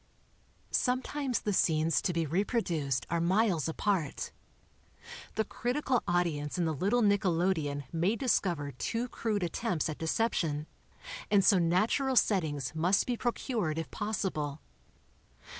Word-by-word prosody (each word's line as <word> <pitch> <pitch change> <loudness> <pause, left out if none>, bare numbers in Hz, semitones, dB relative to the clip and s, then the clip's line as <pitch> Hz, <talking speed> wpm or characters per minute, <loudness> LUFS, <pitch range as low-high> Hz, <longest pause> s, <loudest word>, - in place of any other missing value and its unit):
Sometimes 255 +1 0
the 205 - -1
scenes 160 -2 +2
to - - 0
be 165 -1 0
reproduced 165 - 0
are 170 -1 +1
miles 180 -2 +2
apart. 170 -3 -1 1.0
The 220 - +2
critical 250 +2 -1
audience 170 -3 0
in 175 - +1
the 160 - 0
little 205 - +1
nickelodeon 175 -7 +1
may 175 +7 +1
discover 175 - 0
too 230 - -2
crude 215 -5 -2
attempts 175 -1 -1
at 155 - -5
deception, 160 -4 0 0.6
and 200 -2 +4
so 195 -2 +6
natural 210 +11 +2
settings 155 - +1
must 175 +5 +2
be 245 - -1
procured 230 - -2
if 165 - -4
possible. 180 -9 -2
180 Hz, 125 wpm, -31 LUFS, 160-220 Hz, 1.0 s, so